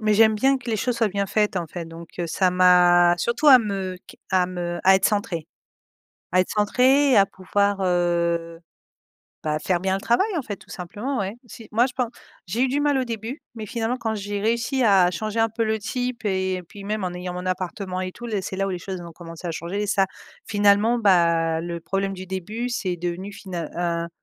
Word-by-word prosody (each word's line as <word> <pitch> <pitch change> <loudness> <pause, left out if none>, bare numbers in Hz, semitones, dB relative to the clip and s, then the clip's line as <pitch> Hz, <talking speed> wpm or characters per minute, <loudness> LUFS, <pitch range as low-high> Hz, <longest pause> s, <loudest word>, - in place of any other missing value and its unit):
mais 215 -1 +2
j'aime 220 0 +5
bien 270 +4 +3
que 240 -2 -6
les 220 - +1
choses 235 +3 -1
soient 225 -2 +3
bien 200 +1 -1
faites, 210 -1 +1
en 170 - -1
fait, 170 +1 -7
donc 165 0 -10
heu, 170 - -1
ça 185 +3 +2
m'a 180 -1 +6
surtout 240 - +2
à 260 -2 +10
me 195 -4 -3
q - - -14
à 185 -1 +3
me 175 -1 -4
à 190 0 +7
être 195 - -2
centrée. 205 -7 -1 0.9
À 185 - +5
être 185 - -4
centrée, 255 +6 +3
à 195 - +7
pouvoir, 200 +1 0
heu, 170 -2 0 0.8
bah, 155 -1 0
faire 175 +2 0
bien 190 0 +1
le 195 - -4
travail, 235 - +2
en - - 0
fait, 205 -3 -5
tout - - -20
simplement, 215 +10 -4
ouais. 195 +1 -2
Si 225 +1 -11
moi 235 +3 +4
je 255 - -10
pen 250 -2 0 0.4
j'ai 225 +8 -1
eu 265 - +3
du 285 +2 0
mal 290 -2 +2
au 260 - 0
début 230 +5 -5
mais 220 - -6
finalement, 230 +3 -2
quand 225 -2 -2
j'ai 205 0 -4
réussi 235 +4 0
à 190 -4 +5
changer 215 +4 -3
un 225 0 +3
peu 225 +1 -1
le 220 0 0
type 245 +1 -3
et 190 -2 0
puis 200 -1 -11
même 210 -1 -2
en 180 - -3
ayant 180 0 -5
mon 180 +1 -5
appartement 185 0 -3
et 185 0 -3
tout 240 - -9
les 210 -4 -1
c'est 190 - -5
là 195 0 0
où - - -2
les 180 - -3
choses 185 0 -6
ont 170 -1 -9
commencé 170 +1 -9
à - - -2
changer 175 +6 -3
et - - -3
ça 195 -1 +3 0.4
finalement, 205 +3 +3
bah, 170 -5 +3
le 170 0 -4
problème 195 +2 -2
du 185 0 -8
début 210 +7 -4
c'est 185 -7 -2
devenu 175 +4 -4
final 175 -6 -6
«un 170 -1 -1
195 Hz, 230 wpm, -23 LUFS, 180-225 Hz, 0.9 s, à